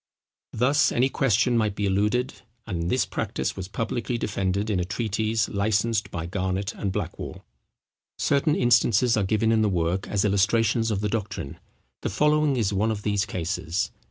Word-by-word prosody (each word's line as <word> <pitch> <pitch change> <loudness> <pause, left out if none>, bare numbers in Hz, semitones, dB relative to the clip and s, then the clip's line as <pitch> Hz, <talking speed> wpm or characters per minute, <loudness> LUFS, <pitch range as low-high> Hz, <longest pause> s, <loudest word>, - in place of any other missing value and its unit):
Thus 140 +6 +3
any 130 +3 +2
question 120 -2 +2
might 110 -3 +1
be 105 - -1
eluded: 105 +6 +1 0.3
and 85 -5 -3
this 125 - +2
practice - - -3
was 95 -1 -6
publicly 115 +3 -2
defended 100 0 -1
in 95 - +1
a - - +1
treatise 110 +2 -1
licensed 110 +1 0
by 80 -1 -4
Garnet 95 +2 -2
and 100 - -3
Blackwall. - - -5 0.7
Certain 145 +2 +2
instances 120 -1 +3
are 110 - +1
given 110 +3 +1
in 110 -1 +3
the 105 - +2
work 90 +1 -1
as 100 0 0
illustrations 110 +3 +2
of 105 -2 -1
the 105 - 0
doctrine. 100 -10 -4 0.4
The - - -2
following 150 +5 +2
is 105 -4 0
one 105 +3 +1
of 105 -2 -3
these 105 -1 0
cases. 85 0 -2
105 Hz, 165 wpm, -25 LUFS, 95-115 Hz, 0.7 s, Thus